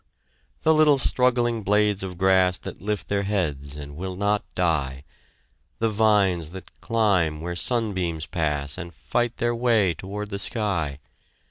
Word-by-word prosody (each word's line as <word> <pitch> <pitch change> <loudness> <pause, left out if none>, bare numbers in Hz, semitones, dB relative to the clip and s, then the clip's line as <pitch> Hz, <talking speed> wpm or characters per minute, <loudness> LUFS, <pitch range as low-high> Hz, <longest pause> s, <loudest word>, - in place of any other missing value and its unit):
The 160 - +5
little 155 -2 +5
struggling 120 -2 +3
blades 105 0 +2
of 95 -2 -5
grass 95 -1 +3
That - - -9
lift 105 +1 -3
their 100 0 0
heads 75 -9 -2
and 70 -1 -8
will 95 +3 -5
not 100 +2 0
die, 70 -7 0 0.7
The 115 -1 0
vines 100 -6 +2
that 95 - -15
climb 95 -9 +1
where 85 +2 -4
sunbeams 95 -8 -1
pass, 75 -1 -2
And 85 -2 -8
fight 120 +7 -2
their 120 0 0
way 115 -6 +2
toward 105 +5 -7
the 100 - -3
sky! 95 - -1
95 Hz, 145 wpm, -24 LUFS, 85-110 Hz, 0.7 s, The